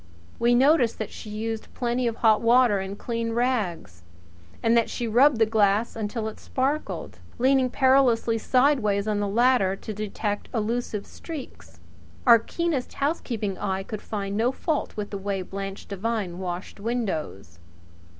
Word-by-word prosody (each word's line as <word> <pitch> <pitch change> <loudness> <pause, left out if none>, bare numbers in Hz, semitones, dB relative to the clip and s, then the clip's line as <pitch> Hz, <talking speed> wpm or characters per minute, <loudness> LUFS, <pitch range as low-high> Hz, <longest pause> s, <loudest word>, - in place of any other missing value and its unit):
We 240 +1 +4
noticed 260 -2 +4
that 220 - -5
she 215 - -9
used 220 +1 -4
plenty 245 0 0
of 230 - -1
hot 220 -2 +3
water 235 -3 +4
and 195 +1 -5
clean 230 0 -3
rags, 215 - -1 0.6
and 230 +1 +4
that 230 -1 +3
she 240 - -3
rubbed 250 +4 +5
the 225 - +4
glass 215 0 +2
until 220 0 -3
it 220 - -7
sparkled, 280 +3 -3 0.2
leaning 260 +1 +3
perilously 255 -4 +3
sideways 230 -6 +2
on 210 -1 0
the 205 - 0
ladder 225 -2 +3
to 215 - -7
detect 210 0 -3
elusive 225 -1 -2
streaks. 315 -6 -10 0.5
Our 235 -2 +8
keenest 310 +2 -2
housekeeping 235 - -2
eye 195 -1 -2
could 210 +1 -6
find 200 -2 -4
no 230 +4 +2
fault 300 -1 -2
with 205 -1 -4
the 200 - -4
way 195 -1 -2
Blanche 195 +1 -6
Devine 200 -3 -3
washed 180 +1 -5
windows. 175 - -3
225 Hz, 150 wpm, -25 LUFS, 200-245 Hz, 0.6 s, Our